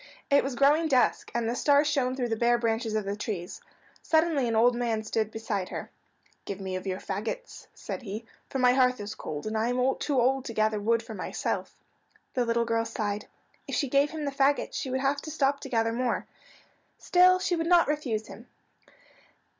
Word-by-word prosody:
It 280 Hz, -, +5 dB
was 270 Hz, -2 st, -3 dB
growing 295 Hz, +5 st, +4 dB
dusk, 260 Hz, -4 st, +2 dB
and 235 Hz, -1 st, 0 dB
the 235 Hz, -, 0 dB
stars 285 Hz, +2 st, +4 dB
shown 265 Hz, -4 st, +1 dB
through 250 Hz, -2 st, -2 dB
the 225 Hz, -, 0 dB
bare 240 Hz, +2 st, +3 dB
branches 225 Hz, -1 st, -1 dB
of 215 Hz, -2 st, -1 dB
the 200 Hz, +1 st, -2 dB
trees. 200 Hz, -4 st, -5 dB, 0.4 s
Suddenly 315 Hz, -5 st, +2 dB
an 230 Hz, -, 0 dB
old 240 Hz, +2 st, +4 dB
man 230 Hz, -2 st, -1 dB
stood 215 Hz, 0 st, -1 dB
beside 215 Hz, -4 st, -3 dB
her. -, -, -6 dB, 0.5 s
"Give 200 Hz, -1 st, -6 dB
me 190 Hz, -1 st, -4 dB
of 185 Hz, +1 st, -5 dB
your 185 Hz, -1 st, -1 dB
fagots," 225 Hz, -, -5 dB
said -, -, -6 dB
he, 215 Hz, 0 st, -6 dB, 0.2 s
"for -, -, -3 dB
my 250 Hz, -1 st, +5 dB
hearth 255 Hz, -2 st, +3 dB
is 205 Hz, +1 st, -5 dB
cold, 150 Hz, -1 st, -6 dB
and 215 Hz, +1 st, -3 dB
I 220 Hz, +1 st, +1 dB
am 250 Hz, +2 st, +1 dB
too 280 Hz, -4 st, 0 dB
old 260 Hz, +2 st, +2 dB
to 230 Hz, -, -5 dB
gather 215 Hz, 0 st, +2 dB
wood 230 Hz, +2 st, +1 dB
for 225 Hz, -1 st, -8 dB
myself." 190 Hz, -, -3 dB, 0.6 s
The 250 Hz, -3 st, +1 dB
little 235 Hz, 0 st, +1 dB
girl 230 Hz, 0 st, +1 dB
sighed. 210 Hz, -2 st, -3 dB, 0.4 s
If -, -, -3 dB
she 280 Hz, -, +1 dB
gave 280 Hz, +2 st, +3 dB
him 310 Hz, -1 st, -5 dB
the 280 Hz, -, -1 dB
fagots 275 Hz, +1 st, +1 dB
she 265 Hz, -, -3 dB
would 260 Hz, +1 st, -1 dB
have 280 Hz, +1 st, +1 dB
to -, -, -7 dB
stop 280 Hz, -2 st, +1 dB
to 270 Hz, -, -8 dB
gather 225 Hz, -2 st, +1 dB
more. 245 Hz, 0 st, -1 dB, 0.7 s
Still 365 Hz, +1 st, +5 dB
she 365 Hz, -1 st, 0 dB
would 330 Hz, 0 st, -2 dB
not 345 Hz, -1 st, +5 dB
refuse 255 Hz, -8 st, -1 dB
him. 235 Hz, +4 st, -12 dB
240 Hz, 210 wpm, -28 LUFS, 220-275 Hz, 0.7 s, It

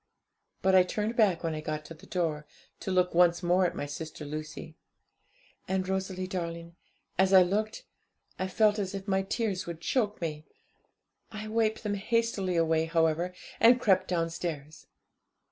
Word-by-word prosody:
But 190 Hz, 0 st, +4 dB
I 185 Hz, -, +8 dB
turned 210 Hz, +5 st, -2 dB
back 200 Hz, -8 st, +3 dB
when 165 Hz, -1 st, -1 dB
I 155 Hz, -, -4 dB
got 155 Hz, 0 st, -4 dB
to 165 Hz, -, -9 dB
the 160 Hz, -, -16 dB
door, 155 Hz, -4 st, -2 dB, 0.3 s
to -, -, -5 dB
look 180 Hz, -1 st, +2 dB
once 175 Hz, 0 st, +4 dB
more 180 Hz, +1 st, +3 dB
at -, -, -6 dB
my -, -, -3 dB
sister 155 Hz, +1 st, -7 dB
Lucy. 155 Hz, +2 st, -7 dB, 0.9 s
And, 190 Hz, -1 st, -1 dB
Rosalie 190 Hz, -1 st, -2 dB
darling, 170 Hz, -2 st, -5 dB, 0.4 s
as 190 Hz, 0 st, +4 dB
I 190 Hz, -1 st, +9 dB
looked, 210 Hz, +4 st, -2 dB, 0.5 s
I 185 Hz, -, -1 dB
felt 210 Hz, +2 st, +3 dB
as 195 Hz, -1 st, -3 dB
if 195 Hz, +1 st, -6 dB
my 190 Hz, -1 st, +2 dB
tears 195 Hz, -1 st, -2 dB
would 170 Hz, -2 st, -5 dB
choke 210 Hz, +3 st, 0 dB
me. 155 Hz, -2 st, -4 dB, 0.8 s
I 215 Hz, -1 st, -6 dB
wiped 220 Hz, 0 st, 0 dB
them 210 Hz, -1 st, -1 dB
hastily 205 Hz, -3 st, 0 dB
away, 160 Hz, -1 st, +2 dB
however, 165 Hz, +1 st, +1 dB, 0.3 s
and 240 Hz, +3 st, +6 dB
crept 190 Hz, -6 st, +3 dB
downstairs. 165 Hz, -3 st, -3 dB
180 Hz, 160 wpm, -29 LUFS, 165-200 Hz, 0.9 s, I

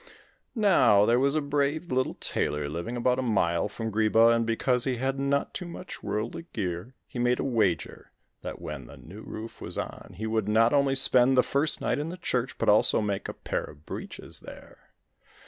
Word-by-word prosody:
Now 185 Hz, -, +5 dB
there 120 Hz, +2 st, +3 dB
was 140 Hz, +2 st, +2 dB
a 155 Hz, -, +2 dB
brave 145 Hz, +3 st, -1 dB
little 130 Hz, 0 st, 0 dB
tailor 75 Hz, -1 st, -1 dB
living 85 Hz, +11 st, -4 dB
about 125 Hz, +1 st, +1 dB
a -, -, +1 dB
mile 100 Hz, -6 st, +1 dB
from 110 Hz, +1 st, -5 dB
Greeba, 110 Hz, +2 st, +4 dB
and 115 Hz, -1 st, 0 dB
because 125 Hz, +2 st, +1 dB
he 130 Hz, -2 st, 0 dB
had 135 Hz, +2 st, -2 dB
not 140 Hz, +1 st, 0 dB
too 180 Hz, -, -5 dB
much 180 Hz, +2 st, -8 dB
worldly 115 Hz, +10 st, -4 dB
gear, 95 Hz, +5 st, -4 dB
he 120 Hz, -, -8 dB
made 125 Hz, +1 st, +2 dB
a -, -, 0 dB
wager 110 Hz, -10 st, -1 dB, 0.3 s
that -, -, -6 dB
when 70 Hz, -5 st, -7 dB
the -, -, -12 dB
new 100 Hz, +7 st, -11 dB
roof 110 Hz, +1 st, -8 dB
was -, -, -6 dB
on, -, -, -6 dB
he 110 Hz, -, -4 dB
would 110 Hz, -2 st, -1 dB
not 115 Hz, +3 st, +4 dB
only 140 Hz, -1 st, +3 dB
spend 130 Hz, -1 st, +4 dB
the 125 Hz, -, +6 dB
first 145 Hz, +3 st, 0 dB
night -, -, 0 dB
in 150 Hz, +2 st, -3 dB
the 180 Hz, -, -6 dB
church, 125 Hz, -7 st, -2 dB
but -, -, -2 dB
also 105 Hz, +1 st, +6 dB
make 100 Hz, -2 st, -2 dB
a -, -, -4 dB
pair -, -, -3 dB
of 75 Hz, -, -13 dB
breeches -, -, -3 dB
there. -, -, -14 dB
120 Hz, 200 wpm, -27 LUFS, 105-135 Hz, 0.3 s, the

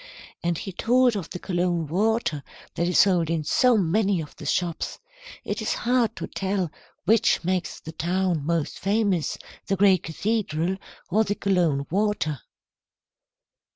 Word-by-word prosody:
And 170 Hz, -1 st, 0 dB
he 195 Hz, -, -5 dB
told 245 Hz, +5 st, +3 dB
of 190 Hz, -5 st, -4 dB
the -, -, -5 dB
Cologne 175 Hz, -2 st, -1 dB
water 195 Hz, -1 st, 0 dB, 0.3 s
that 170 Hz, -, 0 dB
is 180 Hz, -, +1 dB
sold 180 Hz, -5 st, +4 dB
in 165 Hz, -2 st, 0 dB
so 245 Hz, +10 st, +4 dB
many 195 Hz, +1 st, +2 dB
of 155 Hz, -2 st, -7 dB
the 150 Hz, -, -7 dB
shops. 170 Hz, +2 st, -1 dB, 0.5 s
It -, -, -3 dB
is -, -, 0 dB
hard 240 Hz, -2 st, +2 dB
to -, -, -4 dB
tell 190 Hz, -4 st, -2 dB, 0.3 s
which 220 Hz, -1 st, +3 dB
makes 185 Hz, +1 st, -1 dB
the 160 Hz, -, -9 dB
town 175 Hz, -1 st, 0 dB
most 165 Hz, 0 st, -1 dB
famous, 200 Hz, -5 st, +1 dB, 0.3 s
the 195 Hz, -, +1 dB
great 195 Hz, -2 st, +4 dB
cathedral 185 Hz, -1 st, -1 dB, 0.3 s
or 215 Hz, +4 st, +4 dB
the 205 Hz, -1 st, -1 dB
Cologne 170 Hz, -9 st, +1 dB
water." 185 Hz, -, 0 dB
185 Hz, 150 wpm, -25 LUFS, 165-205 Hz, 0.5 s, sold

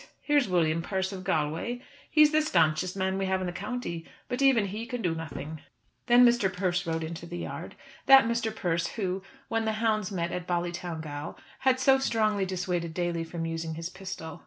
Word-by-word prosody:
Here's 290 Hz, -5 st, +3 dB
William 165 Hz, -2 st, +2 dB
Persse 190 Hz, +2 st, -2 dB
of 185 Hz, -, -7 dB
Galway. 165 Hz, +7 st, -1 dB, 0.3 s
He's 305 Hz, -1 st, +6 dB
the 310 Hz, 0 st, +4 dB
stanchest 175 Hz, -, +2 dB
man 190 Hz, 0 st, 0 dB
we 195 Hz, -, 0 dB
have 190 Hz, 0 st, +1 dB
in 185 Hz, -, -2 dB
the 175 Hz, -, -3 dB
county, 190 Hz, -4 st, -4 dB, 0.3 s
but 250 Hz, +2 st, -2 dB
even 265 Hz, -6 st, +5 dB
he 215 Hz, +4 st, -5 dB
can 245 Hz, -2 st, -4 dB
do 175 Hz, -3 st, +1 dB
nothing." 160 Hz, -1 st, -6 dB, 0.5 s
Then 245 Hz, 0 st, +7 dB
Mr. 235 Hz, -5 st, +3 dB
Persse 180 Hz, -1 st, -1 dB
rode 165 Hz, 0 st, -1 dB
into 165 Hz, +1 st, -6 dB
the 175 Hz, 0 st, -6 dB
yard, -, -, -6 dB, 0.3 s
that 270 Hz, -2 st, +9 dB
Mr. 235 Hz, -1 st, 0 dB
Persse 170 Hz, -5 st, -1 dB
who, 190 Hz, -2 st, -1 dB, 0.3 s
when 225 Hz, 0 st, 0 dB
the 220 Hz, -, +1 dB
hounds 215 Hz, -2 st, 0 dB
met 170 Hz, -3 st, -2 dB
at 180 Hz, -1 st, -4 dB
Ballytowngal, 170 Hz, -4 st, -3 dB, 0.2 s
had 260 Hz, -1 st, +3 dB
so 265 Hz, 0 st, +5 dB
strongly 215 Hz, -6 st, +1 dB
dissuaded 180 Hz, -3 st, -2 dB
Daly 175 Hz, -2 st, -1 dB
from 165 Hz, 0 st, -5 dB
using 165 Hz, -1 st, -3 dB
his 165 Hz, +1 st, -4 dB
pistol. 185 Hz, -5 st, -7 dB
185 Hz, 190 wpm, -28 LUFS, 170-225 Hz, 0.5 s, that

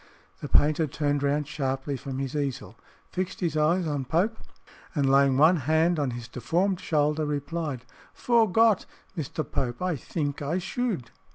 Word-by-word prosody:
The -, -, -6 dB
painter 155 Hz, +2 st, +3 dB
turned 145 Hz, 0 st, -1 dB
round 145 Hz, +1 st, 0 dB
sharply 140 Hz, -2 st, -2 dB
from 135 Hz, 0 st, -6 dB
his 135 Hz, +1 st, -3 dB
easel, 130 Hz, -8 st, -3 dB, 0.4 s
fixed 185 Hz, 0 st, -3 dB
his 170 Hz, -4 st, -1 dB
eyes 165 Hz, +4 st, +2 dB
on 145 Hz, -4 st, -2 dB
Pope, 185 Hz, -, 0 dB, 0.6 s
and 140 Hz, -3 st, +2 dB
laying 135 Hz, -1 st, +4 dB
one 160 Hz, +5 st, +6 dB
hand 160 Hz, +4 st, +2 dB
on 145 Hz, -3 st, 0 dB
his 120 Hz, -1 st, -6 dB
deformed 170 Hz, -, 0 dB
shoulder, 150 Hz, 0 st, +1 dB
replied, 150 Hz, -2 st, -3 dB, 0.3 s
"Fore 230 Hz, -4 st, +2 dB
Gott, 225 Hz, 0 st, +4 dB, 0.3 s
Mister 155 Hz, -1 st, -3 dB
Pope, 125 Hz, -2 st, -3 dB
I 180 Hz, -1 st, 0 dB
theenk 145 Hz, +2 st, -3 dB
I 150 Hz, +5 st, -1 dB
shoode." 190 Hz, -, -3 dB
150 Hz, 160 wpm, -27 LUFS, 135-170 Hz, 0.6 s, one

